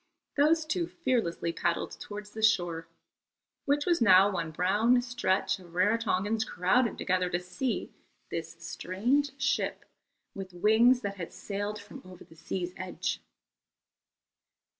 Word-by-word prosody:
Those 310 Hz, +2 st, +3 dB
two 340 Hz, +2 st, -1 dB
fearlessly 230 Hz, -, -1 dB
paddled 170 Hz, -, -1 dB
towards 205 Hz, 0 st, -8 dB
the 220 Hz, -, -7 dB
shore, 175 Hz, -6 st, +2 dB, 0.8 s
which 290 Hz, 0 st, +1 dB
was 345 Hz, -5 st, +2 dB
now 195 Hz, -2 st, +7 dB
one 170 Hz, -4 st, -2 dB
brown 205 Hz, +9 st, +3 dB
stretch 240 Hz, -6 st, 0 dB
of 175 Hz, -2 st, -15 dB
Rarotongans 210 Hz, +2 st, +1 dB
crowded 220 Hz, +6 st, +1 dB
together 185 Hz, -1 st, 0 dB
to 175 Hz, -, 0 dB
see 180 Hz, +8 st, -3 dB, 0.4 s
this 165 Hz, 0 st, -4 dB
strange 265 Hz, +10 st, 0 dB
ship 275 Hz, +1 st, 0 dB, 0.5 s
with 190 Hz, -2 st, -8 dB
wings 225 Hz, +7 st, +5 dB
that 200 Hz, 0 st, -4 dB
had 170 Hz, -3 st, -6 dB
sailed 205 Hz, +1 st, -4 dB
from 215 Hz, +7 st, -11 dB
over 185 Hz, -1 st, -12 dB
the -, -, -18 dB
sea's 180 Hz, +2 st, -4 dB
edge. 185 Hz, -1 st, -3 dB
205 Hz, 130 wpm, -29 LUFS, 180-245 Hz, 0.8 s, now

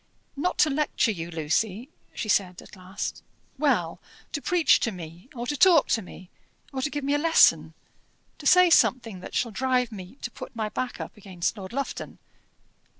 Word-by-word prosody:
"Not 325 Hz, +6 st, -1 dB
to 310 Hz, -, +4 dB
lecture 275 Hz, -4 st, +1 dB
you, 170 Hz, -4 st, -5 dB
Lucy," 180 Hz, -, -1 dB, 0.3 s
she -, -, -4 dB
said 190 Hz, -3 st, 0 dB
at -, -, -15 dB
last. 185 Hz, +1 st, -6 dB, 0.4 s
"Well, -, -, +1 dB, 0.3 s
to 285 Hz, -, -3 dB
preach 345 Hz, -2 st, +3 dB
to 230 Hz, -, -1 dB
me, 175 Hz, +3 st, -10 dB
or 240 Hz, 0 st, -4 dB
to 290 Hz, -, -2 dB
talk 335 Hz, 0 st, +5 dB
to 225 Hz, -, +2 dB
me, 180 Hz, -1 st, -13 dB, 0.4 s
or 265 Hz, -, -3 dB
to 295 Hz, -, -1 dB
give 290 Hz, -1 st, -4 dB
me 280 Hz, +1 st, 0 dB
a 290 Hz, -, +2 dB
lesson; 330 Hz, +1 st, +4 dB, 0.6 s
to 290 Hz, -, -3 dB
say 360 Hz, -1 st, +6 dB
something 230 Hz, -, +3 dB
that -, -, -9 dB
shall 235 Hz, -, 0 dB
drive 250 Hz, +1 st, 0 dB
me 190 Hz, 0 st, -9 dB
to 240 Hz, -, -4 dB
put -, -, -10 dB
my 220 Hz, -2 st, -2 dB
back 255 Hz, +3 st, -4 dB
up -, -, -7 dB
against 190 Hz, -2 st, -3 dB
Lord 190 Hz, -3 st, -8 dB
Lufton?" 275 Hz, +3 st, -5 dB
235 Hz, 185 wpm, -26 LUFS, 190-280 Hz, 0.6 s, say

